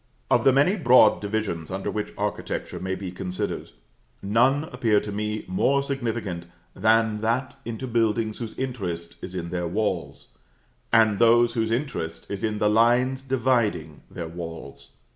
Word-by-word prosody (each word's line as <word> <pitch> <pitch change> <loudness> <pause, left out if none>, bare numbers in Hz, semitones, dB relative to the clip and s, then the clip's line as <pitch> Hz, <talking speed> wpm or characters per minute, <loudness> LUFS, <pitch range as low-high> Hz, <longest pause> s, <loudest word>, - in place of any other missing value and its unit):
Of - - +4
the 135 - +7
many 145 +10 +3
broad 125 - +5
divisions 100 -6 -3
under 95 +1 -3
which 105 -1 -3
architecture - - -3
may 95 0 -2
be 95 -1 -6
considered, 90 0 -4 0.5
none 125 +8 +3
appear 120 -8 +1
to 105 - -6
me 105 +1 -3
more 140 +9 +2
significant 115 -10 -3 0.3
than 110 +1 +2
that 120 +4 -1
into 115 +2 -4
buildings 115 -2 0
whose 115 -3 -6
interest 95 -11 -4
is 95 - -7
in 85 -2 -4
their 90 -1 -2
walls, 105 +5 -3 0.6
and 110 -3 +4
those 120 0 +5
whose 110 -2 0
interest 115 - -3
is 100 - -4
in 110 -1 0
the 105 - +2
lines 120 +4 +3
dividing 120 - 0
their 85 - -6
walls. 80 -4 -9
110 Hz, 150 wpm, -25 LUFS, 95-120 Hz, 0.6 s, the